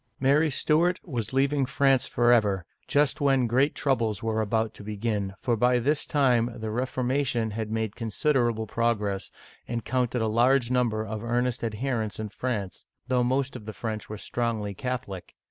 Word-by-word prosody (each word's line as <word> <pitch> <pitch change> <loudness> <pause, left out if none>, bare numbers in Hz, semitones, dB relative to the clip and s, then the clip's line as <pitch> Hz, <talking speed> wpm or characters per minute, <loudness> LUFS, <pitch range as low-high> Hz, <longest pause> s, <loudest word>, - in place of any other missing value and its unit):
Mary 145 +4 +3
Stuart 165 +6 +2
was 120 - -3
leaving 135 +1 +2
France 135 0 +2
forever, 110 -6 +3 0.2
just 145 0 +2
when 135 -3 +3
great 130 +5 +2
troubles 115 -7 0
were 110 -1 0
about 110 +1 0
to - - -12
begin, 105 -2 -2
for 120 -3 +1
by 125 +2 +3
this 140 +5 +1
time 125 -5 +2
the 110 0 -4
Reformation 125 -1 0
had 110 0 -4
made 110 -1 -2
considerable 120 -1 0
progress, 105 -3 -1 0.4
and 115 -1 -3
counted 125 -2 0
a - - +1
large 120 +3 +3
number 115 -4 +1
of 110 0 -5
earnest 120 +1 0
adherents 115 -1 -2
in 110 -1 -4
France, 105 -3 -4 0.3
though 125 -1 +3
most 130 +2 0
of 110 -4 -9
the 110 - -5
French 110 -2 -5
were 105 - -5
strongly 110 -2 -2
Catholic. 125 -6 -5
120 Hz, 165 wpm, -27 LUFS, 110-130 Hz, 0.4 s, Mary